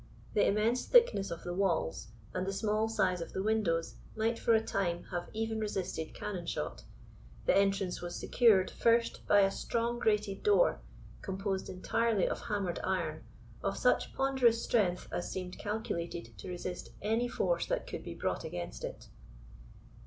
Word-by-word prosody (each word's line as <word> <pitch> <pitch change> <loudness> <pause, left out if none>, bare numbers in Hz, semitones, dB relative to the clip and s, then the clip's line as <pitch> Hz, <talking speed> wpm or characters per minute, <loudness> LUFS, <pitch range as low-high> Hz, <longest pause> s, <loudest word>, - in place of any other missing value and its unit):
The 205 - +4
immense 220 +5 +2
thickness 470 - +5
of 170 - -6
the 175 - -3
walls, 175 - 0 0.3
and 185 +1 -2
the 195 - -1
small 215 +2 +1
size 185 -5 +1
of 165 - -6
the 190 - -2
windows, 200 -7 0 0.2
might, 225 +1 0
for 230 - +4
a 220 - +3
time, 175 -3 -1
have 175 -1 -3
even 220 0 -2
resisted 190 -6 -3
cannon 185 -5 -5
shot. - - -4 0.6
The - - +4
entrance 195 -2 +2
was 175 0 -5
secured, 215 -6 +4
first, 230 0 +2
by 205 -1 +6
a 195 0 +4
strong 235 +3 -1
grated 210 -3 +1
door, 420 +4 +4 0.4
composed 195 0 -3
entirely 215 +2 +1
of - - -2
hammered 200 -5 -1
iron, 170 -5 -2 0.4
of - - -1
such - - +2
ponderous 260 -4 +3
strength 185 -6 +1
as 175 0 -3
seemed 185 -1 -5
calculated 190 -6 -4
to - - -7
resist 180 0 -5
any 225 +3 +1
force 175 -7 0
that - - -1
could - - -6
be - - -7
brought - - -2
against 85 -9 -5
it. - - -6
195 Hz, 160 wpm, -32 LUFS, 180-225 Hz, 0.6 s, by